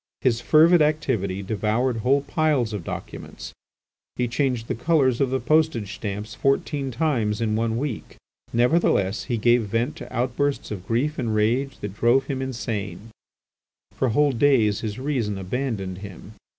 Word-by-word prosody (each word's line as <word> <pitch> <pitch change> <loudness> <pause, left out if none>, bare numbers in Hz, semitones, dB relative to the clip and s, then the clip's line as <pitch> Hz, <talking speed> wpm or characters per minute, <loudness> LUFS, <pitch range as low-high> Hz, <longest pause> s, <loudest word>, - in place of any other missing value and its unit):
His 120 -3 +1
fervid 165 +2 +5
activity 115 -11 0
devoured 110 +5 0
whole 130 +5 +2
piles 140 -6 0
of 100 -5 -4
documents; - - -7 0.6
he 125 - 0
changed 125 -2 -1
the - - -1
colours 130 -2 +2
of 135 - +2
the 130 +1 0
postage 135 -6 +1
stamps 105 0 -5
fourteen 135 +4 0
times 115 -6 0
in 110 -2 0
one 115 0 0
week. 135 -3 -4 0.4
Nevertheless, 120 - +2
he 120 -3 -1
gave 120 +2 +4
vent 115 +7 -1
to - - -9
outbursts 130 +4 -1
of 95 -3 -6
grief 135 +7 0
and 110 -2 -1
rage 120 +6 +1
that 105 -2 -5
drove 120 +5 +3
him 135 -2 -3
insane; 115 -5 -4 0.8
for 130 - 0
whole 145 +5 +3
days 115 -5 +3
his 110 -1 -4
reason 130 -7 -2
abandoned 95 -2 -3
him. 100 +1 -10
120 Hz, 150 wpm, -24 LUFS, 105-135 Hz, 0.8 s, fervid